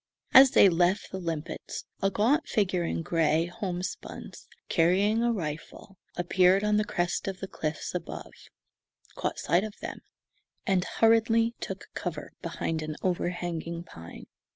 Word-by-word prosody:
As 265 0 +10
they 200 - +7
left 180 +2 +2
the 190 - -4
limpets, 165 -2 -5 0.2
a 195 - +3
gaunt 240 - +2
figure 185 -4 +1
in 165 0 -2
gray 165 0 +2
homespuns, 180 +1 -6 0.2
carrying 195 +6 +3
a 240 0 +2
rifle, 165 0 -6 0.2
appeared 185 +2 +3
on 210 0 +2
the 210 - +3
crest 175 -3 -2
of 195 -1 -4
the 195 - -5
cliffs 155 -3 -4
above, - - -6 0.8
caught - - -3
sight 175 +5 +2
of 215 -1 -6
them, - - -6 0.7
and 190 -2 +2
hurriedly 225 0 +3
took - - -6
cover - - -5
behind 160 -1 -3
an 155 0 -4
overhanging 175 -2 -2
pine. 85 - -11
180 Hz, 140 wpm, -28 LUFS, 170-210 Hz, 0.8 s, As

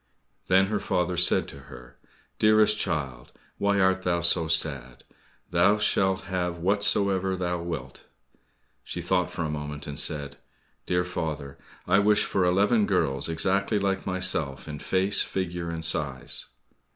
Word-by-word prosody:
Then 95 +1 +4
her 105 +1 -2
father 90 0 -1
said 90 - +3
to - - -11
her, - - -13 0.4
"Dearest 110 0 +4
child, 65 - -4 0.3
why 100 0 +1
art 95 0 +2
thou 85 -2 0
so 85 -1 +6
sad? 70 -6 -1 0.5
Thou 90 +5 +3
shalt 95 -2 +1
have 90 -2 -3
whatsoever 100 0 +1
thou 90 -1 -2
wilt." 75 -7 -7 0.8
She - - -6
thought 90 0 0
for 85 - -4
a - - -2
moment 75 -1 -6
and 75 0 -5
said, 75 -2 +1 0.5
"Dear 90 0 +1
father, 80 -6 -5 0.3
I 95 +2 +4
wish 105 +1 +3
for 95 - 0
eleven 100 +5 +2
girls 80 -7 0
exactly 95 +6 0
like 95 -1 -2
myself 80 -8 -1
in 75 -1 -7
face, 95 +5 0
figure, 90 -2 -3
and 80 -1 -4
size." 70 -5 -2
90 Hz, 145 wpm, -26 LUFS, 80-95 Hz, 0.8 s, so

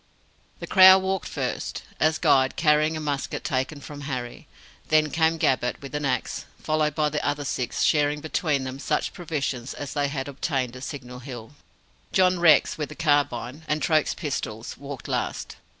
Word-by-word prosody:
The - - -5
Crow 190 0 +9
walked 190 0 -2
first, - - -4 0.2
as 155 0 +3
guide, 130 -1 +3
carrying 155 0 +3
a - - -3
musket 145 -3 -3
taken 135 +3 -2
from 145 +1 -9
Harry. 125 -2 -5 0.4
Then 155 -1 +3
came 165 0 +2
Gabbett, 130 -5 +1
with 140 0 -10
an 150 0 -2
axe; 130 -2 -2
followed 155 -1 0
by 150 -1 +2
the 150 0 -2
other 145 0 -1
six, 125 -2 -2
sharing 150 -1 +2
between 150 -2 -1
them 130 +1 -6
such - - -1
provisions 145 -8 -3
as 145 - -6
they 145 -1 +1
had 140 -1 -4
obtained 135 -3 -2
at 130 +1 -7
Signal 125 -3 -7
Hill. 120 -3 -9 0.6
John 185 -1 +4
Rex, 160 -2 +5
with 150 - -2
the 150 - -9
carbine, 145 -3 0
and 150 0 0
Troke's 155 +1 +2
pistols, 115 -8 -4
walked 140 -2 -8
last. - - -3
145 Hz, 170 wpm, -25 LUFS, 130-155 Hz, 0.6 s, Crow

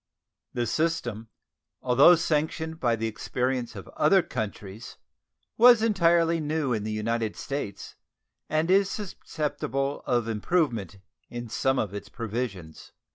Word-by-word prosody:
The 120 -1 0
system, 120 -5 -1 0.5
although 135 +7 +7
sanctioned 160 0 -1
by 120 -2 +2
the 115 0 -3
experience 125 +2 -2
of 95 - -9
other 185 +4 +3
countries, 105 +2 -6 0.6
was 240 -1 +8
entirely 170 -5 +3
new 150 -3 -1
in 110 -2 -2
the 110 - -3
United 110 0 -1
States, 135 -8 -5 0.6
and 155 +3 +1
is 195 0 +4
susceptible 150 -7 -3
of 120 -2 +1
improvement 115 - -1 0.3
in 120 -1 -6
some 135 +4 +1
of 105 -5 -1
its 100 0 -7
provisions. 110 -7 -5
125 Hz, 125 wpm, -27 LUFS, 110-160 Hz, 0.6 s, was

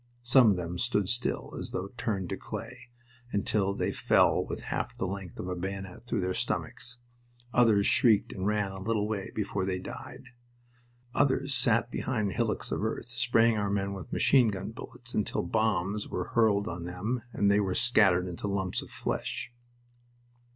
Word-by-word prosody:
Some 120 -1 +6
of 100 - +3
them 90 0 -4
stood 105 -4 +1
still, 120 +1 -1
as - - -4
though 95 +2 -4
turned 100 -6 -2
to - - -1
clay, - - -8 0.4
until 100 -1 +1
they - - 0
fell - - +3
with - - -5
half - - -3
the - - -1
length 95 -1 -6
of - - -4
a 90 - -2
bayonet 95 +4 -6
through 115 -4 0
their 90 0 0
stomachs. 120 +6 -3 0.6
Others 110 -4 +5
shrieked 110 -4 +4
and 95 0 -2
ran 105 -2 +1
a 95 0 -8
little 105 0 0
way 105 -3 -3
before 100 -2 -1
they 95 -1 -1
died. 90 - -9 0.8
Others 135 0 +2
sat 120 -1 +2
behind 110 -6 -1
hillocks - - -1
of - - -1
earth, 110 +2 -3
spraying 115 -2 +3
our 100 -1 0
men 100 0 -1
with 95 -4 -8
machine 130 -4 +4
gun 100 0 -3
bullets 120 +1 -10
until 105 - 0
bombs 105 0 0
were 90 - -3
hurled 110 -3 +3
on 85 -2 -5
them 100 +8 -2
and 100 -3 +2
they 100 - +4
were 95 -3 0
scattered 100 -7 +4
into 90 +3 -4
lumps 95 -2 -1
of - - -11
flesh. 120 - -3
105 Hz, 175 wpm, -29 LUFS, 95-115 Hz, 0.8 s, Some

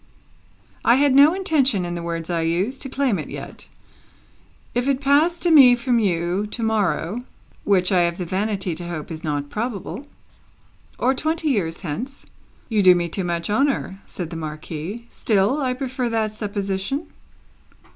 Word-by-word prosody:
"I 235 - +5
had 280 0 +3
no 285 +5 +7
intention, 280 - +2
in 175 - -4
the 170 - -4
words 170 0 -4
I 170 -1 0
used, 180 +11 -1
to 270 - -4
claim 265 -5 0
it - - -6
yet. - - -8 1.1
If 245 +2 0
it 275 -2 +2
passed 295 +5 +2
to 350 - +3
me 265 -6 +8
from 240 0 +1
you, 180 0 0
to 230 +2 -4
morrow 215 -1 0 0.2
" - - -32
"Which 185 -2 +3
I 185 -2 +4
have 170 0 0
the 180 - -4
vanity 195 0 -1
to 170 +2 -6
hope 170 -2 -6
is 160 0 -7
not 145 -2 -3
probable." 235 +4 -4 0.4
" - - -35
or 260 - +2
twenty 315 +3 -1
years 175 - -1
hence 225 - -6 0.2
" - - -33
"You 220 -4 +1
do 185 -2 +7
me 175 -1 -1
too 190 +3 -2
much 170 -1 -2
honour," 230 -4 0
said 175 -2 -6
the - - -6
Marquis; 160 +7 -6
"still, 215 +7 +1
I 255 -2 0
prefer 255 -2 -3
that 220 -2 -1
supposition." 205 - -3
210 Hz, 175 wpm, -22 LUFS, 175-260 Hz, 1.1 s, me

